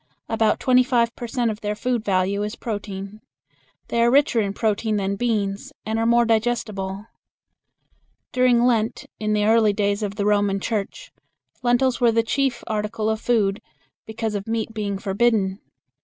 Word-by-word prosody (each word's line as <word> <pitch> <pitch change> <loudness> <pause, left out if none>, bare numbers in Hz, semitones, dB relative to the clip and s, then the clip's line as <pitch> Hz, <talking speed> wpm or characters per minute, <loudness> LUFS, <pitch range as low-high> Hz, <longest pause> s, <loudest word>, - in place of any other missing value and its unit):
About 225 -1 +1
twenty 255 -1 +4
five 235 -2 +1
per 240 - -6
cent 235 -1 0
of 210 - -8
their 210 0 -2
food 245 0 -1
value 195 0 +1
is 210 +2 -3
protein. 205 -2 -6 0.7
They 235 - +1
are 235 - +5
richer 265 -3 +3
in 200 -1 -2
protein 215 0 0
than 195 0 -1
beans, 205 -3 -2
and 220 +1 -1
are 225 - +1
more 235 0 +4
digestible. 215 -4 -1 1.3
During 250 -1 +3
Lent 225 -3 +1
in 215 0 0
the 210 0 +2
early 220 -1 +4
days 200 0 0
of 205 -1 -3
the 205 -1 -1
Roman 205 -1 +2
Church, 220 - -4 0.5
lentils 245 +1 +2
were 235 -1 +5
the 230 0 +2
chief 270 +3 -1
article 215 0 -2
of 220 0 -3
food, 210 -4 +1 0.5
because 220 0 -3
of 200 0 -4
meat 225 0 -2
being 205 -2 -2
forbidden. 195 -1 +1
220 Hz, 165 wpm, -23 LUFS, 205-235 Hz, 1.3 s, are